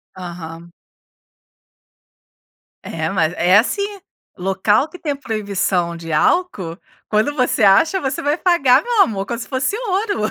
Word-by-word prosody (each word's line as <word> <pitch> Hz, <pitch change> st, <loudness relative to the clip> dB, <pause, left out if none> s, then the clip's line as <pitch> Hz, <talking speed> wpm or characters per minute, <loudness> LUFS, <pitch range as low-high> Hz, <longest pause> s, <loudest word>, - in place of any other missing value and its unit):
Aham. 170 Hz, -2 st, -9 dB, 2.1 s
É, 160 Hz, -1 st, -3 dB
mas 165 Hz, -3 st, 0 dB
é 180 Hz, +3 st, +4 dB
assim, 255 Hz, -, +1 dB, 0.6 s
local 195 Hz, -, +1 dB
que 360 Hz, -, -13 dB
tem 290 Hz, -3 st, -2 dB
proibição 200 Hz, -8 st, -2 dB
de 165 Hz, -1 st, -8 dB
álcool, 185 Hz, -, 0 dB, 0.3 s
quando 215 Hz, +7 st, +1 dB
você 255 Hz, -4 st, 0 dB
acha, 205 Hz, -, +4 dB
você 270 Hz, 0 st, -3 dB
vai 290 Hz, +3 st, 0 dB
pagar, 340 Hz, -10 st, +3 dB
meu 475 Hz, -3 st, +2 dB
amor, 195 Hz, -, +1 dB
como 235 Hz, +1 st, -4 dB
se -, -, -7 dB
fosse 260 Hz, +7 st, -1 dB
ouro. 400 Hz, -, -1 dB
215 Hz, 135 wpm, -19 LUFS, 180-295 Hz, 2.1 s, é